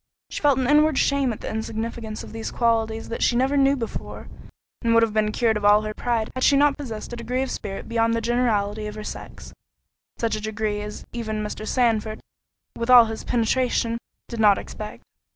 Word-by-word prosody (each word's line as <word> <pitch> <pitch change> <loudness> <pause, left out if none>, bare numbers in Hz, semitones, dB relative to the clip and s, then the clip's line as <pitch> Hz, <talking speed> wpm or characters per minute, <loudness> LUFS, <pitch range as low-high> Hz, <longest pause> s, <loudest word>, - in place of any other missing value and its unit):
She - - -4
felt 285 -3 +4
an 260 - 0
inward 300 0 +4
shame 280 -3 +2
at 220 - -7
the - - -5
insignificance 220 0 -4
of - - -11
these 225 0 -4
qualities 225 -1 0
that 230 - -4
she 240 - +3
never 265 +3 +2
knew 275 0 +4
before, 230 -4 -6 0.5
and 230 -1 +2
would 230 - +6
have 225 -2 0
been 215 -1 +1
cured 225 -1 +1
of 210 - -6
all 205 +1 +5
her 215 0 -4
pride, 230 -1 -1
had 255 - -3
she 280 - +5
not 290 0 +4
possessed 240 -6 -7
a - - -3
degree 245 +3 -2
of 265 - -4
spirit 195 -2 -5
beyond 230 0 +1
the - - +1
generality 220 -3 0
of 210 - -7
her 215 - -6
sex—such 230 +1 -7
a 215 - -5
degree 215 -1 -2
as 210 0 -7
even 220 -3 -3
Mr. 215 +1 -5
Sandford, 220 -3 +1 0.6
with 235 +1 -4
all 245 -2 +9
his 225 0 -6
penetration, 235 0 0 0.3
did 235 - -6
not 210 -2 +6
expect. 215 0 -8
230 Hz, 205 wpm, -24 LUFS, 215-245 Hz, 0.6 s, all